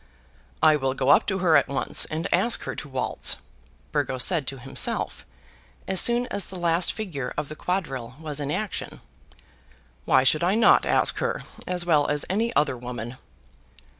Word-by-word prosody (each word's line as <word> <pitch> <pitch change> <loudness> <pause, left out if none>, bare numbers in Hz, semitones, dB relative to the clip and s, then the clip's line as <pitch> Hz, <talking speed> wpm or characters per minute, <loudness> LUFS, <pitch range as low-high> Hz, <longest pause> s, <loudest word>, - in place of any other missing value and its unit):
"I 155 -1 +6
will 135 -2 -1
go 135 0 0
up 145 - +5
to 190 -2 0
her 165 -2 +5
at 140 - +4
once, 135 -1 -1
and 160 +4 -3
ask 195 +7 +2
her - - -4
to 150 - -7
waltz," 130 -1 0 0.5
Burgo - - -1
said 150 +1 +1
to 135 - -4
himself, 135 +1 -2 0.6
as 190 -1 +4
soon 240 +1 +3
as 200 - -2
the 190 - -10
last 170 0 +1
figure 155 - -5
of 150 -1 -3
the 155 - -7
quadrille 135 -10 -3
was 150 -2 -4
in 145 -1 -3
action. 205 +7 -4 1.0
"Why 130 - +4
should 155 +5 +3
I 185 +4 +2
not 230 - +5
ask - - +3
her - - -2 0.2
as 180 -1 0
well 155 -4 +3
as 145 0 -1
any 225 +4 0
other 150 - +2
woman?" 120 0 -6
155 Hz, 175 wpm, -25 LUFS, 135-180 Hz, 1.0 s, I